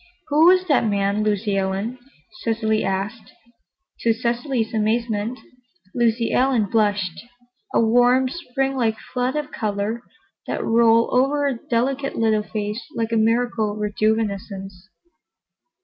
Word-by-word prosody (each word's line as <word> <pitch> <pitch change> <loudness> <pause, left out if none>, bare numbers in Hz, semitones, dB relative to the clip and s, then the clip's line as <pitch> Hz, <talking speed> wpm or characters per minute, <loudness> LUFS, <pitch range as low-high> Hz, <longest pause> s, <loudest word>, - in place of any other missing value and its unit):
"Who 305 +3 +5
was 370 0 +5
that 290 -8 +3
man, 200 0 0
Lucy 210 -1 0
Ellen?" 195 +6 -2 0.4
Cecily 220 -1 0
asked. 195 +4 -3 0.7
To 230 - +2
Cecily's 235 0 -1
amazement, 220 +1 0 0.6
Lucy 230 -1 +1
Ellen 255 -4 +3
blushed—a 235 - -2
warm, 245 +3 +4
Spring 270 -2 -2
like 225 -4 0 0.2
flood 250 +1 0
of 300 -1 -3
color 210 +1 -2 0.5
that - - -2
rolled 230 0 +4
over 275 +3 +2
her 240 - -5
delicate 270 +3 0
little 220 -2 +2
face 210 +1 -4
like 225 0 -2
a - - +1
miracle 225 -1 +1
of - - -8
rejuvenescence. 210 -2 -1
230 Hz, 120 wpm, -22 LUFS, 210-250 Hz, 0.7 s, Who